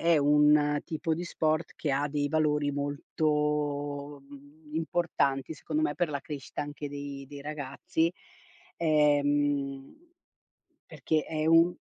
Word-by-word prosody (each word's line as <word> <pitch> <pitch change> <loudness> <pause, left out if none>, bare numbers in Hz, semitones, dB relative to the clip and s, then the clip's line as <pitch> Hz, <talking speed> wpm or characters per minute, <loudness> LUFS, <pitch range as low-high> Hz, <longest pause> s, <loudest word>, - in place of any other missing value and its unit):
è - - +5
un 150 0 +4
tipo 160 -1 -1
di 170 +3 -3
sport 155 -1 -1
che 145 - -2
ha 145 +2 +1
dei 145 0 -1
valori 150 -2 +2
molto, 145 0 -1
mhmm, 145 +2 -15
importanti, 160 -3 0
secondo 300 - -2
me, 325 - +1
per 175 -3 0
la 140 -1 -2
crescita 145 -2 -6
anche 145 0 -5
dei 140 -1 -7
dei 145 -1 -9
ragazzi. 150 +3 -2 0.7
Ehm, 145 -3 +2 0.9
perché 155 -2 -1
è 155 -1 -2
un 165 +2 +5
145 Hz, 125 wpm, -29 LUFS, 145-155 Hz, 0.9 s, è